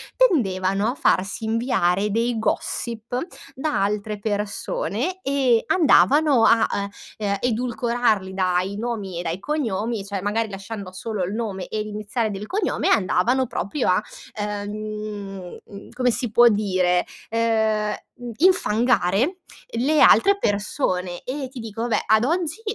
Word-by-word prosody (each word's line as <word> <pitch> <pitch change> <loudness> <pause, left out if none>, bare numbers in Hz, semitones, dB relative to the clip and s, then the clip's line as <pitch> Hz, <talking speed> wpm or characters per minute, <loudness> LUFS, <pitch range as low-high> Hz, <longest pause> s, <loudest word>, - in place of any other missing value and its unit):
tendevano 200 - +2
a - - -7
farsi 195 -4 +1
inviare 220 -4 +1
dei 230 +2 0
gossip 230 +2 -2 0.4
da 280 -4 0
altre 210 +1 -2
persone 210 - -2
e 270 -6 +2
andavano, 295 -6 +4
a, 230 - +5 0.5
eh, 215 - -4
ehm 200 0 0
edulcorarli 235 -4 0
dai 185 +1 0
nomi 210 -6 -4
e - - -4
dai 170 +2 -3
cognomi 230 -6 -2
cioè 200 -1 -4
magari 215 +3 -1
lasciando 195 0 -7
solo 210 0 -3
il 180 +3 -3
nome 210 -5 -4
e 215 - -3
l'iniziale 215 +2 -3
del 200 +1 -6
cognome, 410 - -1
andavano 230 +6 +2
proprio 240 +5 -2
a, 185 +2 +3 0.4
ehm, 205 -2 -5
uhm 200 -1 -12
come 250 0 +1
si 240 -1 -2
può 240 +2 +7
dire, 185 -4 +1 0.2
ehm, 220 -2 +1 0.4
infangare 250 - +2 0.4
le 300 +5 +3
altre 400 0 +6
persone 195 - -1
e 265 0 -4
ti 260 -1 -9
dico 225 -1 -6
vabbè, 240 -1 0
ad 220 +1 +4
oggi 335 +5 -1
215 Hz, 130 wpm, -23 LUFS, 200-245 Hz, 0.5 s, può